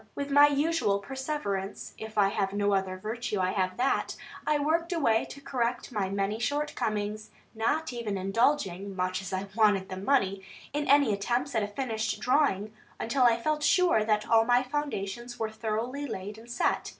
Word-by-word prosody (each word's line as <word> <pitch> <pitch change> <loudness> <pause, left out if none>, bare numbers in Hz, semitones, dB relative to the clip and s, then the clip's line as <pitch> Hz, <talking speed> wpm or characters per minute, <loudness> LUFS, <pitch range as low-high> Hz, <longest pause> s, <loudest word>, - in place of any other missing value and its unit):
With 280 0 -4
my 285 +1 +8
usual 290 -7 +1
perseverance 205 -4 -4
if 220 0 -9
I 200 -1 +5
have 195 -1 -1
no 205 0 +1
other 190 -1 0
virtue, 215 +1 -3
I 185 0 +1
have 185 -2 -1
that 255 +2 0 0.3
I 300 - +3
worked 325 +4 0
away 250 -10 +2
to 280 - -10
correct 245 -2 -2
my 205 -5 -1
many 200 +2 -1
shortcomings; 215 -7 -2 0.2
not 255 +6 0
even 225 -4 -3
indulging 195 -1 0
(much 185 0 -1
as 195 0 -7
I 190 +1 -2
wanted 205 -4 +3
the 185 - -5
money) 195 -3 +1 0.3
in 295 0 -1
any 280 -6 +5
attempts 240 +7 -1
at 225 - +2
a 205 - -1
finished 220 -2 -2
drawing, 215 -4 +1 0.3
until 250 +3 +2
I 235 -1 +4
felt 305 +4 0
sure 355 - +4
that 210 -1 +1
all 225 0 +5
my 245 +2 +3
foundations 245 -4 -4
were 220 -2 -2
thoroughly 230 +6 -3
laid 205 -1 -6
and 230 +2 -14
set. 240 - 0
225 Hz, 175 wpm, -29 LUFS, 200-275 Hz, 0.3 s, my